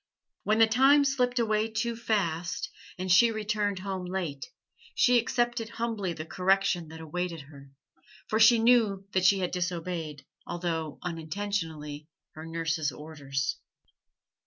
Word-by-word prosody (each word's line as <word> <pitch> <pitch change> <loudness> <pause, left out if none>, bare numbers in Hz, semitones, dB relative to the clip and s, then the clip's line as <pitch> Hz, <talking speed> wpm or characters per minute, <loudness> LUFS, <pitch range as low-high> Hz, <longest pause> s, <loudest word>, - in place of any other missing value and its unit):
When 215 +1 +1
the 225 - +7
time 270 +6 +5
slipped 250 -2 +1
away 215 -2 +1
too 230 +1 -2
fast, 185 -7 -2 0.3
and 185 0 -2
she 205 +6 +7
returned 210 -2 -1
home 190 -1 -4
late, 175 -7 -4 0.5
she 245 -1 +5
accepted 240 -1 -1
humbly 230 -5 -3
the 155 -1 -6
correction 185 -1 +1
that 160 +1 -10
awaited 170 +1 -4
her, 140 -1 -14 0.6
for 220 - 0
she 230 +2 +7
knew 225 -4 +3
that 185 -1 +1
she 195 0 +5
had 180 - -1
disobeyed 170 -4 -4 0.2
although 165 -3 -3
unintentionally 160 -3 -4 0.2
her 155 +1 -9
nurse's 165 -2 -1
orders. 140 -1 -4
185 Hz, 135 wpm, -28 LUFS, 160-220 Hz, 0.6 s, the